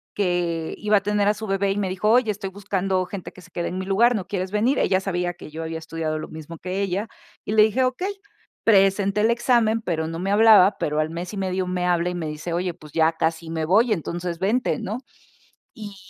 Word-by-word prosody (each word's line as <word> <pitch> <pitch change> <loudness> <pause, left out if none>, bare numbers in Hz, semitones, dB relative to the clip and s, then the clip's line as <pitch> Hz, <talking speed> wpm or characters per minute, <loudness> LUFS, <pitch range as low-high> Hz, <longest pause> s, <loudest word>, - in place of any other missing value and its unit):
que 175 -4 -1
iba 210 0 +3
a - - +1
tener 205 -1 +1
a 210 - +4
su 215 0 -7
bebé 195 0 +1
y 195 - -2
me 200 -2 -1
dijo: 190 +3 0
"Oye, 240 -2 +4
estoy 195 -1 -5
buscando 190 -1 -1
gente 190 -1 -7
que 185 - -15
se - - -16
quede 175 - -3
en 185 - -5
mi 190 - -4
lugar, 235 +5 +3
¿no 190 -4 -4
quieres 185 -1 -3
venir?", 230 +6 +2
ella 185 - +2
sabía 180 -2 -2
que 170 - -12
yo 160 +2 -6
había 160 0 -4
estudiado 160 -1 -3
lo - - -6
mismo 160 +1 -9
que 185 +2 -3
ella, 195 +3 -1 0.4
y 210 - -2
le 215 - +7
dije: 220 +5 +2
'Okey", 370 +11 -2 0.4
presenté 195 -1 +3
el 225 +2 +4
examen, 235 -2 +2
pero 160 -5 -2
no 165 0 -5
me 195 +2 -1
hablaban, 210 -2 +7
pero 150 +1 -1
al 155 0 0
mes 175 +4 -6
y 205 - -5
medio 185 -1 -1
me 180 0 -1
habla 175 0 +1
y 180 - -4
me 165 -3 -3
dice: 150 +3 -5
"Oye, 175 0 -1
pues 155 -3 -15
ya 160 0 +3
casi 160 0 -2
me 160 -1 -2
voy, 215 +8 +3
entonces 170 0 -4
vente", 220 +7 +1
¿no?, 220 +5 -4 0.7
y 205 -2 -9
190 Hz, 240 wpm, -23 LUFS, 170-210 Hz, 0.7 s, le